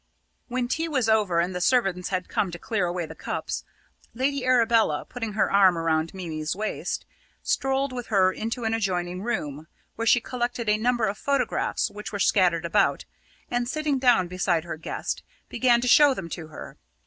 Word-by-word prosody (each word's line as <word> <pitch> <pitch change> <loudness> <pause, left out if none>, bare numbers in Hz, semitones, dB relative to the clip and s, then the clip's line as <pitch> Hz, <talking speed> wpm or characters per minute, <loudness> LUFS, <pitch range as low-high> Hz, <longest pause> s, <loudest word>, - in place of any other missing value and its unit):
When 250 0 -2
tea 320 +6 -1
was 260 -7 0
over 210 -6 +3
and 175 +2 0
the 180 - -3
servants 190 -4 +1
had 185 -1 -2
come 195 - 0
to 175 - -7
clear 200 -1 -1
away 175 -1 -2
the 160 - -9
cups, - - -4 0.5
Lady 270 +2 0
Arabella, 230 -10 +3
putting 225 -4 -5
her 210 - +1
arm 190 -3 +5
round 160 0 0
Mimi's 160 -3 -3
waist, 215 +2 -3 0.4
strolled 270 0 0
with 245 -2 -5
her 190 -3 +3
into 230 +2 -4
an 225 0 0
adjoining 180 -4 -1
room, 155 -9 -3 0.3
where 230 +1 -2
she 245 - +6
collected 240 -1 -3
a 210 0 +3
number 240 0 +1
of 200 0 -3
photographs 280 0 0
which 210 +1 -7
were 205 - -3
scattered 180 -4 +3
about, 200 +4 +1 0.5
and, 245 0 0
sitting 300 -2 0
down 245 -8 +4
beside 175 -2 0
her 170 - -5
guest, 160 - -4 0.3
began 240 -2 +3
to 250 - -1
show 285 +2 +6
them 170 - -6
to 160 -1 -6
her. 155 - -10
210 Hz, 185 wpm, -25 LUFS, 175-245 Hz, 0.5 s, she